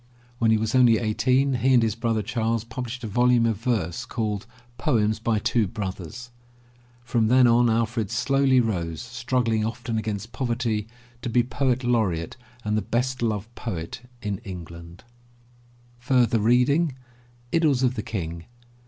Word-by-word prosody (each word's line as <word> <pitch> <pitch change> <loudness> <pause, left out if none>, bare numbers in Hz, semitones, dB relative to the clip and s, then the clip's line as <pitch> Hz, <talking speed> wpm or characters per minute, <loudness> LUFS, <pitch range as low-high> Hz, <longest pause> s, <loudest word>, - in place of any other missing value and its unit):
When 115 - +3
he 110 - +4
was 110 0 -2
only 125 -3 +6
eighteen 130 +5 +1
he 130 +2 +3
and 120 - +5
his 110 -2 +1
brother 115 -1 -1
Charles 115 0 -1
published 120 +2 -6
a - - -3
volume 120 +2 +3
of 115 -3 +1
verse 105 -7 -1
called, 110 -2 -3 0.3
Poems 110 -5 +1
by 115 0 0
Two 110 +1 +1
Brothers, 110 +5 -6 0.7
From 120 -2 +1
then 125 +2 +5
on, 120 0 +4
Alfred 115 -2 0
slowly 135 +2 +3
rose, 85 -9 -1
struggling 115 - -1
often 115 0 -3
against 110 0 -4
poverty, 115 -4 -1 0.3
to 125 - -3
be 120 +1 +3
Poet 130 +1 0
Laureate 105 -10 0 0.3
and 105 0 0
the 110 - +1
best 125 +3 -1
loved 110 0 -2
poet 90 -2 -5 0.2
in 100 -2 -2
England. 85 -4 -10 1.1
Idylls 125 +2 +1
of 125 -1 +3
the 115 - -3
King. 85 -6 -5
115 Hz, 145 wpm, -25 LUFS, 110-125 Hz, 1.1 s, only